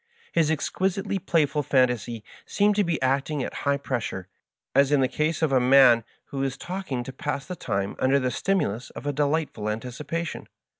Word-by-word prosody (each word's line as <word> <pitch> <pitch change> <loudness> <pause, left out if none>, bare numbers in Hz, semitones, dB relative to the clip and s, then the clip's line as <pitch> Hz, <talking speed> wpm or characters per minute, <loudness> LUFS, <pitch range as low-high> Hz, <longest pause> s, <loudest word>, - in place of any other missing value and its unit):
His 165 -2 +2
exquisitely 190 +5 -1
playful 160 -5 +1
fantasy 125 -5 +1 0.2
seemed 205 0 +2
to 205 - +4
be 170 -3 -1
acting 135 +2 0
at - - -5 0.2
high 140 - +3
pressure, 120 -9 -4 0.5
as 140 +1 +4
in 145 - +4
the 130 - +3
case 155 +4 -1
of 155 - +2
a 130 - +4
man 125 -2 +6 0.3
who 135 - -3
is 135 -1 -2
talking 175 -9 -4
to 130 - -8
pass 140 +1 -3
the 180 - -6
time 100 - -2
under 135 +2 +3
the 130 -1 -1
stimulus 125 - -1
of - - -10
a 145 - 0
delightful 145 -6 -1
anticipation. 135 +9 -4
140 Hz, 180 wpm, -25 LUFS, 125-160 Hz, 0.5 s, man